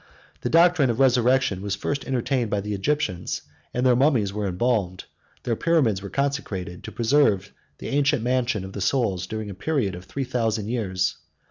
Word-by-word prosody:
The -, -, -2 dB
doctrine 165 Hz, -4 st, +5 dB
of 115 Hz, -, 0 dB
the 135 Hz, -, +4 dB
resurrection 125 Hz, -5 st, +3 dB
was 100 Hz, 0 st, -2 dB
first 140 Hz, +7 st, -3 dB
entertained 130 Hz, -2 st, 0 dB
by 105 Hz, -, 0 dB
the 105 Hz, +1 st, -4 dB
Egyptians; 100 Hz, -, -1 dB, 0.3 s
106 -, -, -15 dB
and 125 Hz, +1 st, +1 dB
their 125 Hz, -1 st, +5 dB
mummies 120 Hz, -7 st, +2 dB
were 105 Hz, -1 st, -2 dB
embalmed, 95 Hz, -1 st, 0 dB, 0.4 s
their 120 Hz, -, 0 dB
pyramids 130 Hz, -, +2 dB
were 100 Hz, -, -7 dB
constructed, 110 Hz, -11 st, -3 dB
to -, -, -7 dB
preserve 115 Hz, -5 st, +2 dB, 0.2 s
the -, -, -6 dB
ancient 140 Hz, -4 st, +2 dB
mansion 125 Hz, -5 st, 0 dB
of 95 Hz, -, -9 dB
the 100 Hz, -, -5 dB
soul, 115 Hz, -2 st, +1 dB
during 105 Hz, +3 st, -5 dB
a -, -, -6 dB
period 115 Hz, -, -1 dB
of 90 Hz, +1 st, -9 dB
three 135 Hz, +8 st, -4 dB
thousand 115 Hz, -4 st, -1 dB
years. 95 Hz, -6 st, -1 dB
115 Hz, 190 wpm, -24 LUFS, 100-135 Hz, 0.4 s, doctrine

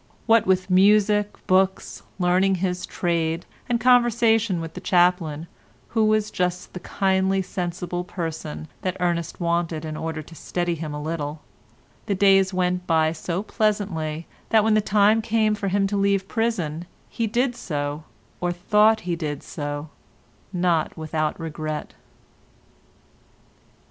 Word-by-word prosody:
What 225 Hz, -2 st, +4 dB
with 185 Hz, 0 st, +1 dB
music, 210 Hz, +2 st, +4 dB
books, 190 Hz, +1 st, +1 dB, 0.2 s
learning 185 Hz, +1 st, +3 dB
his 180 Hz, 0 st, -2 dB
trade, 165 Hz, -1 st, -1 dB, 0.2 s
and 240 Hz, -1 st, +1 dB
conversation 230 Hz, -5 st, +3 dB
with 165 Hz, -1 st, -6 dB
the -, -, -8 dB
chaplain, 175 Hz, -4 st, +2 dB, 0.4 s
who 220 Hz, -1 st, +2 dB
was 215 Hz, 0 st, +1 dB
just 180 Hz, 0 st, -2 dB
the 180 Hz, -, -6 dB
kindly, 190 Hz, 0 st, +1 dB
sensible 175 Hz, 0 st, -4 dB
person 160 Hz, -4 st, -5 dB
that 185 Hz, -1 st, -2 dB
Ernest 170 Hz, -2 st, -1 dB
wanted 170 Hz, -2 st, -1 dB
in 155 Hz, -1 st, -5 dB
order 160 Hz, 0 st, -4 dB
to 165 Hz, -, -15 dB
steady 175 Hz, +1 st, -2 dB
him 155 Hz, -2 st, -5 dB
a -, -, -4 dB
little, 150 Hz, -1 st, -4 dB, 0.6 s
the 200 Hz, -, +1 dB
days 195 Hz, 0 st, +4 dB
went 180 Hz, -1 st, -1 dB
by 160 Hz, -1 st, +3 dB
so 170 Hz, +3 st, -3 dB
pleasantly 190 Hz, -8 st, -1 dB, 0.2 s
that 220 Hz, -1 st, +4 dB
when 220 Hz, 0 st, +3 dB
the 215 Hz, -, +4 dB
time 210 Hz, +2 st, +3 dB
came 220 Hz, -1 st, +1 dB
for 210 Hz, -1 st, -3 dB
him 195 Hz, +1 st, +1 dB
to 200 Hz, +1 st, -1 dB
leave 200 Hz, -1 st, +1 dB
prison, 180 Hz, -9 st, -2 dB, 0.2 s
he 230 Hz, -2 st, -2 dB
did 245 Hz, +3 st, 0 dB
so, 145 Hz, -4 st, -4 dB, 0.4 s
or 175 Hz, 0 st, 0 dB
thought 210 Hz, +5 st, +3 dB
he 175 Hz, -1 st, -2 dB
did 150 Hz, -4 st, -4 dB
so, 145 Hz, 0 st, -5 dB, 0.6 s
not 175 Hz, -4 st, 0 dB
without 155 Hz, 0 st, -2 dB
regret. 155 Hz, -1 st, -5 dB
180 Hz, 140 wpm, -23 LUFS, 165-205 Hz, 0.6 s, What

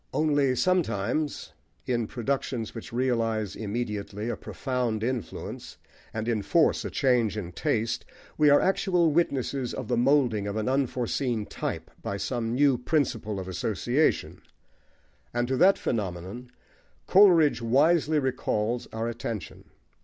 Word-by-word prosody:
Only 145 Hz, -4 st, +2 dB
sometimes, 155 Hz, -, 0 dB, 0.3 s
in 120 Hz, -3 st, 0 dB
productions 120 Hz, -2 st, -3 dB
which 115 Hz, -, -8 dB
realise 115 Hz, -4 st, 0 dB
immediately 105 Hz, -1 st, -4 dB
a -, -, -1 dB
profound 125 Hz, -5 st, -3 dB
influence 120 Hz, -5 st, -5 dB, 0.3 s
and 110 Hz, +1 st, -4 dB
enforce 120 Hz, -, +2 dB
a -, -, -3 dB
change 120 Hz, -6 st, +1 dB
in 90 Hz, -4 st, -5 dB
taste, 115 Hz, -, -1 dB, 0.3 s
we 150 Hz, -1 st, +4 dB
are 145 Hz, -, +7 dB
actual 180 Hz, -3 st, +2 dB
witnesses 140 Hz, -5 st, 0 dB
of 130 Hz, -4 st, -6 dB
the 120 Hz, -, +1 dB
moulding 120 Hz, -5 st, +2 dB
of 100 Hz, -, -3 dB
an 110 Hz, -1 st, -2 dB
unforeseen 125 Hz, -3 st, 0 dB
type -, -, -5 dB
by 100 Hz, -, -3 dB
some 115 Hz, +1 st, -2 dB
new 140 Hz, -2 st, +3 dB
principle 115 Hz, -8 st, -1 dB
of 95 Hz, -, -6 dB
association; 120 Hz, -, 0 dB, 0.9 s
and 120 Hz, 0 st, +1 dB
to 130 Hz, -, 0 dB
that 190 Hz, +5 st, +5 dB
phenomenon 100 Hz, +3 st, -4 dB, 0.6 s
Coleridge 175 Hz, -9 st, +5 dB
wisely 150 Hz, +6 st, +3 dB
recalls 125 Hz, -4 st, -1 dB
our 110 Hz, +1 st, -3 dB
attention. 115 Hz, -6 st, -5 dB
120 Hz, 125 wpm, -27 LUFS, 110-140 Hz, 0.9 s, are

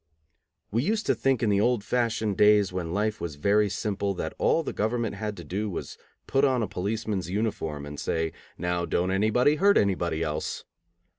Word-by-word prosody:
We 115 Hz, +3 st, +1 dB
used 215 Hz, -, 0 dB
to -, -, +3 dB
think 135 Hz, -3 st, +1 dB
in 110 Hz, -, +3 dB
the 100 Hz, 0 st, +3 dB
old 120 Hz, -2 st, +2 dB
fashioned 115 Hz, -3 st, 0 dB
days 105 Hz, -1 st, +4 dB
when 85 Hz, -3 st, -3 dB
life 105 Hz, +3 st, -1 dB
was 80 Hz, -4 st, -4 dB
very 100 Hz, +7 st, +2 dB
simple 100 Hz, 0 st, -2 dB
that -, -, -4 dB
all 165 Hz, -, +3 dB
that -, -, -4 dB
government 115 Hz, +1 st, -1 dB
had 105 Hz, 0 st, -4 dB
to 85 Hz, -, -8 dB
do 100 Hz, +7 st, -3 dB
was 90 Hz, -, -5 dB
to -, -, -32 dB, 0.3 s
put 135 Hz, -, +1 dB
on 130 Hz, -4 st, +3 dB
a -, -, -1 dB
policeman's 100 Hz, -1 st, -3 dB
uniform, 90 Hz, -8 st, -2 dB
and 75 Hz, 0 st, -7 dB
say, 80 Hz, -1 st, -1 dB, 0.3 s
"Now 90 Hz, 0 st, -1 dB
don't 90 Hz, +2 st, 0 dB
anybody 110 Hz, +9 st, +3 dB
hurt 200 Hz, +4 st, +5 dB
anybody 85 Hz, -5 st, +1 dB
else." 75 Hz, -1 st, -3 dB
105 Hz, 195 wpm, -27 LUFS, 90-115 Hz, 0.3 s, hurt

